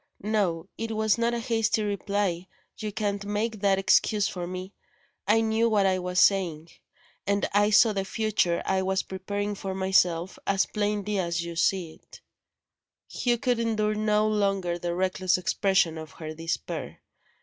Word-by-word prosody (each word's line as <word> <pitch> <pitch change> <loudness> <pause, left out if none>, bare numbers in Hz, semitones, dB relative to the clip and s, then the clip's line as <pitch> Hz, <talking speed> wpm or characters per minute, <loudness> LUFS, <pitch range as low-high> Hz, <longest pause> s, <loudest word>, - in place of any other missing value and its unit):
No; 195 -6 0
it 225 - -3
was 220 0 +2
not 235 0 +1
a - - -2
hasty 225 -1 0
reply 200 -3 -1 0.3
you 215 -1 -4
can't 200 -1 -2
make 210 +2 -2
that 195 -1 +3
excuse 200 +1 +3
for 175 -2 -5
me. 185 +2 -6 0.5
I 220 +2 +4
knew 225 +1 +2
what 205 -3 +3
I 185 -1 +2
was 180 0 -1
saying; 170 -5 +2 0.6
and 200 0 +1
I 205 +1 +4
saw 215 +1 +5
the 195 -1 -1
future 205 -4 0
I 190 0 +1
was 190 0 0
preparing 200 +2 -4
for 195 -1 -5
myself, 185 -2 +1
as 195 0 +2
plainly 210 -1 -1
as 170 -1 -1
you 170 0 -6
see 175 -1 +1
it - - -17 0.5
" - - -65
Hugh 240 -1 0
could 245 -1 0
endure 215 -2 0
no 215 0 +1
longer 195 -4 0
the 175 0 -3
reckless 185 0 +1
expression 180 -3 +1
of 160 -2 -10
her 155 -1 -7
despair. 165 +1 -5
200 Hz, 165 wpm, -27 LUFS, 180-215 Hz, 0.6 s, saw